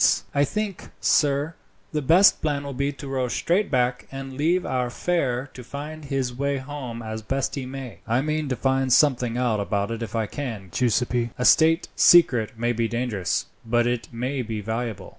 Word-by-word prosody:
"I 140 0 +3
think, 210 +2 -4
sir, 145 +1 +2 0.4
the 150 - -1
best 175 +8 +5
plan 145 -2 -1
will 140 -1 -5
be 140 +2 -1
to 140 0 -9
row 130 -2 -1
straight 180 - 0
back, 125 -1 0
and 135 0 -7
leave 170 +6 +1
our 125 -1 -1
fare 135 -4 -1
to 125 - -9
find 150 +4 -7
his 135 -3 -2
way 140 +2 -1
home 130 -4 -6
as 110 0 -5
best 135 +5 -2
he 135 -3 -4
may." 130 -2 -7
"I 120 +3 +2
mean 155 0 -1
to 130 - 0
find 135 0 0
something 125 -3 +3
out 120 -4 +1
about 100 +1 -1
it 115 0 -4
if 115 -1 -5
I 110 -1 +1
can, 110 -6 -6
Giuseppi. 120 +2 +1
A 125 - -1
state 165 +4 +5
secret 125 -9 +5
may 120 +1 0
be 115 0 0
dangerous, 115 -6 -1 0.2
but 120 +1 +2
it 120 -1 -1
may 125 +3 -2
be 110 -2 -4
valuable. 110 -2 -4
130 Hz, 190 wpm, -24 LUFS, 120-140 Hz, 0.4 s, best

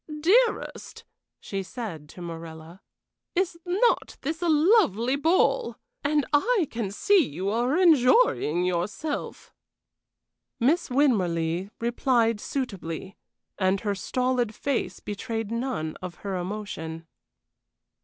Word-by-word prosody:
"Dearest," 440 +9 +1 0.4
she 195 -1 -4
said 185 - -7
to 180 - -10
Morella, 165 +1 -9 0.5
"is 350 -2 0
not 395 +7 +1
this 315 +4 -3
a 345 - +1
lovely 300 - +4
ball? 335 - +2 0.3
And 295 0 +2
I 375 +3 +3
can 225 -4 -3
see 395 - +3
you 185 - -3
are 245 +7 +1
enjoying 285 - +4
yourself." 190 - -3 1.1
Miss 315 +9 +2
Winmarleigh 185 - +1
replied 235 -1 +1
suitably, 195 - -4 0.4
and 190 0 +2
her 205 -2 -1
stolid 245 +2 -1
face 280 -2 -2
betrayed 225 +1 -4
none 230 -10 -2
of 180 -2 -6
her 195 -1 -2
emotion. 180 -4 -5
230 Hz, 105 wpm, -26 LUFS, 185-295 Hz, 1.1 s, lovely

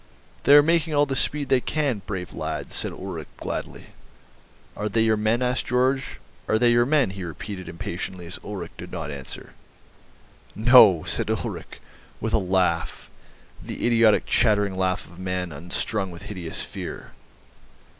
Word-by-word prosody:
"They 145 - +8
are 145 - +9
making 165 -1 +2
all 145 0 +5
the 135 -1 -3
speed 145 +1 -1
they 130 -2 +4
can, 140 -9 -1
brave 95 -4 -5
lads," 80 -2 -4
said - - -1
Ulrich - - -7
gladly. - - -6 0.8
"Are 105 - -2
they 110 +2 +2
your 110 -1 +3
men?" 110 +3 +1
asked 125 +1 0
Georg. 130 +2 +2 0.5
"Are 110 - +3
they 120 +1 +4
your 120 0 +4
men?" 145 -8 +3
he 95 -1 -7
repeated 95 +3 -7
impatiently 85 +1 -5
as 85 - -8
Ulrich 100 -4 -6
did - - -8
not 75 - -4
answer. 70 -2 -7 1.0
"No," 110 -7 +7
said - - -1
Ulrich - - -4 0.4
with 110 +1 -3
a - - +4
laugh, 90 -3 0 0.5
the - - -5
idiotic 115 -2 +4
chattering 105 -4 +2
laugh 95 -1 0
of 90 0 -15
a - - -8
man 90 -1 -2
unstrung 90 +6 -2
with 85 -1 -10
hideous 90 -6 -5
fear. - - -7
105 Hz, 160 wpm, -24 LUFS, 90-125 Hz, 1.0 s, are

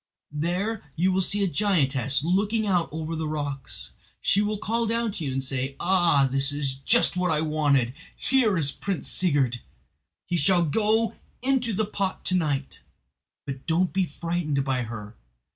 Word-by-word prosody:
There 180 +8 -1
you 185 +3 +2
will 190 +1 +2
see 200 +2 +1
a - - +2
giantess 140 - +1
looking 205 +6 +1
out 180 -4 +1
over 160 +1 -4
the 160 -1 -3
rocks. 145 -3 -4 0.3
She 200 - +2
will 210 0 -1
call 230 +3 -1
down 230 0 0
to 185 - -6
you 140 - -2
and 135 0 -2
say: 135 0 -2
'Ah, 175 -6 +4
this 135 +1 +1
is 145 -2 -1
just 180 - +3
what 180 0 0
I 155 -1 +2
wanted! 145 -6 +1 0.2
Here 240 -8 +2
is 145 -4 +3
Prince 195 +4 -4
Sigurd. 140 -9 +1 0.6
He 175 - -1
shall 170 +3 +3
go 220 +7 +1 0.3
into 260 -3 +1
the 215 +1 0
pot 200 -2 -3
to 185 - +1
night'; 145 -5 -1 0.7
but 135 0 -7
don't 170 +2 +1
be 190 -2 +1
frightened 165 -3 -2
by 130 -2 0
her. 110 -2 -7
170 Hz, 170 wpm, -25 LUFS, 140-200 Hz, 0.7 s, Ah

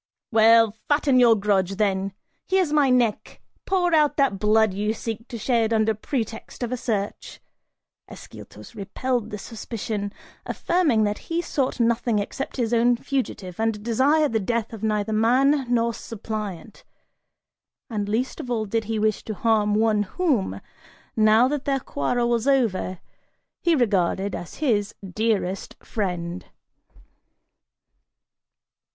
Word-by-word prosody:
"Well, 225 0 +6 0.2
fatten 290 -3 +3
your 235 -2 +6
grudge, 195 -2 +1
then! 195 -1 0 0.3
Here's 375 -5 +1
my 290 -3 +4
neck! 245 -4 +1 0.3
Pour 360 -3 +1
out 300 -2 +3
that 275 -9 +2
blood 215 0 +3
you 210 +3 -1
seek 225 +1 -5
to 235 - -6
shed 230 0 +1
under 220 0 +2
pretext 225 +1 -5
of 240 - -3
a - - 0
search!" 210 -4 -3 0.7
Ascyltos - - -12
repelled 235 +3 -2
this 210 -1 -7
suspicion, 215 -2 -5 0.3
affirming 310 -12 +1
that 210 0 -1
he 335 0 0
sought 275 -7 -1
nothing 235 -1 +1
except 205 +8 -4
his 240 -2 0
own 240 +1 +4
fugitive 225 -10 -4
and 220 -2 -1
desired 275 +5 +2
the 220 - +2
death 230 +2 -2
of 220 - -8
neither 215 -1 0
man 255 +4 +3
nor 235 -1 +2
suppliant, 215 -4 -6 1.0
and 205 -3 -3
least 240 +5 -1
of 250 - -6
all 225 -3 -1
did 225 +2 -1
he 225 +1 -2
wish 215 0 0
to 215 - -4
harm 210 0 +2
one 215 -1 +2
whom, 205 - -1 0.6
now 220 +2 +5
that 285 0 -3
their 275 -1 +1
quarrel 240 - -1
was 235 +1 0
over, 225 -9 +1 0.6
he 340 -2 +3
regarded 195 - +1
as 175 - -7
his 215 -9 0 0.2
dearest 210 -3 -1
friend. 180 -4 -4
225 Hz, 135 wpm, -24 LUFS, 210-250 Hz, 1.0 s, Well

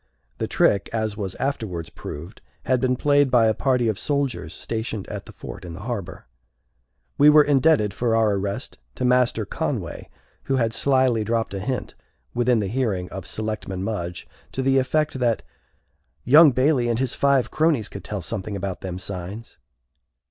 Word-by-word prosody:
The - - -1
trick, 100 - +2
as 110 -2 -1
was 100 -3 -4
afterwards 105 -12 -3
proved, 85 +8 -9 0.2
had 130 -1 +1
been 130 -1 +2
played 145 +1 +3
by 120 -3 +5
a 110 - +3
party 125 -1 +1
of 110 -2 -1
soldiers 140 -3 -1
stationed 110 -3 -4
at - - -6
the - - -10
fort - - -9
in 85 -2 -7
the 85 - -8
harbor. 110 -5 -5 0.9
We 145 +1 +8
were 150 0 +8
indebted 145 -7 +3
for 115 +2 0
our 110 -2 +3
arrest 100 -6 -4 0.2
to - - -2
Master 125 -3 +2
Conway, - - -4 0.4
who 135 - +1
had 115 -3 +1
slyly 130 -5 +2
dropped 115 -1 -1
a 100 - -3
hint, 125 +6 -3 0.4
within 120 0 +2
the 105 -3 0
hearing 100 -5 -1
of 95 -1 -7
Selectman 110 -4 -4
Mudge, 90 -5 -4 0.3
to 130 - -2
the 135 0 +4
effect 150 +1 0
that 120 -3 +1 0.8
"young 150 +5 +8
Bailey 130 -1 +2
and 115 - +1
his 130 0 -1
five 140 -2 +2
cronies 155 -9 +2
could 100 - -9
tell 100 -4 -5
something 100 +1 -4
about 95 -1 -4
them 90 -1 -5
signs." 95 +4 -7
115 Hz, 170 wpm, -23 LUFS, 100-130 Hz, 0.9 s, We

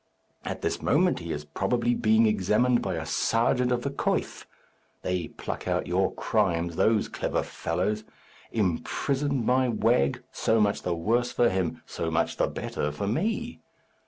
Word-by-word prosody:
At - - -5
this - - -1
moment 180 +5 +2
he 85 -1 -6
is 75 -1 -4
probably 120 +10 0
being 110 -1 +4
examined 110 +4 +2
by 95 -2 -2
a 80 0 -4
serjeant 120 +7 +1
of 120 -1 0
the 140 - -2
coif. 140 - -2 0.6
They 90 -1 -1
pluck - - -6
out - - 0
your - - +1
crimes, 85 0 0
those 110 +4 +3
clever - - -2
fellows! 95 +6 -2 0.5
Imprisoned, 130 - 0
my 130 +1 +3
wag! 110 - +2
So 110 0 +1
much 105 -1 +2
the 90 - -1
worse 120 +8 +1
for 120 -1 +3
him, 95 -3 -2
so 85 - -3
much 80 +1 0
the - - +2
better 75 - -3
for 75 +7 -4
me! 220 - -1
110 Hz, 160 wpm, -27 LUFS, 90-125 Hz, 0.6 s, being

